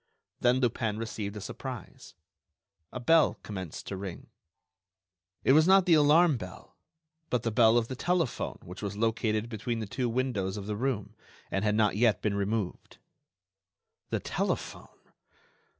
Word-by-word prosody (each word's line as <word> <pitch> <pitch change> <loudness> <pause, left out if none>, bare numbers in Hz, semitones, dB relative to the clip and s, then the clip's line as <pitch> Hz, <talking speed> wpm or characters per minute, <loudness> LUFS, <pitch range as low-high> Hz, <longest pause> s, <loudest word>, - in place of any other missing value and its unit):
Then 125 0 +3
Lupin 115 -3 0
received 110 -2 -4
a - - -6
surprise. 125 +1 -8 0.8
A 125 - -5
bell 160 +6 +4
commenced 95 -6 -6
to 100 - -5
ring. 95 -2 -7 1.1
It - - +4
was 155 +3 +5
not 190 -1 +6
the 175 - +5
alarm 155 0 +5
bell, 95 -4 -10 0.5
but 125 -3 0
the 115 - 0
bell 110 +1 +5
of 115 -1 +1
the 130 - -5
telephone 170 0 -1
which 90 +2 -9
was 100 -1 -4
located 110 0 0
between 115 +1 -3
the 110 - -3
two 120 +4 -2
windows 115 -6 -1
of 100 - -6
the 105 0 -3
room 120 -2 -2 0.4
and 95 - 0
had 105 -1 +2
not 105 -2 +2
yet 110 -2 +3
been 105 - -1
removed. 100 -1 -3 1.1
The - - 0
telephone! - - -3
115 Hz, 150 wpm, -29 LUFS, 105-130 Hz, 1.1 s, not